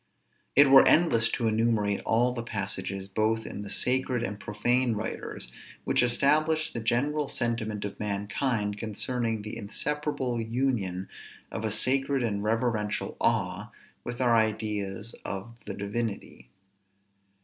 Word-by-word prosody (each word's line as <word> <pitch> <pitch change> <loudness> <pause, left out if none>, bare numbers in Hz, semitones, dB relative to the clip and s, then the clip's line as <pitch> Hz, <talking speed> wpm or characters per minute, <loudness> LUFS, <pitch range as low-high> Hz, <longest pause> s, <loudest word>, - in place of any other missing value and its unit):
_ - - -45 0.5
It 140 0 +7
were 135 - +9
endless 115 -9 +4
to 115 - 0
enumerate 110 -2 +1
all 120 +2 +3
the 120 - -3
passages, 100 -3 -3
both 110 +3 0
in 100 - -6
the 100 - -7
sacred 125 +3 +2
and 105 -1 -4
profane 120 +4 +1
writers, 105 - -4 0.3
which - - +2
establish 155 +6 +2
the - - -2
general 140 +6 0
sentiment 115 -5 -2
of 100 - -6
mankind, 105 +1 -1
concerning 115 0 -2
the 105 - -6
inseparable 140 +2 -2
union 110 -6 -1 0.4
of 110 - -4
a 110 - 0
sacred 135 +4 +1
and 100 -3 -1
reverential 110 -1 -1
awe, - - +1 0.3
with 120 0 -5
our 120 -2 +4
ideas 105 -1 -1
of 100 +4 -5
the - - -4
divinity. 105 +1 -4
115 Hz, 135 wpm, -28 LUFS, 105-125 Hz, 0.5 s, were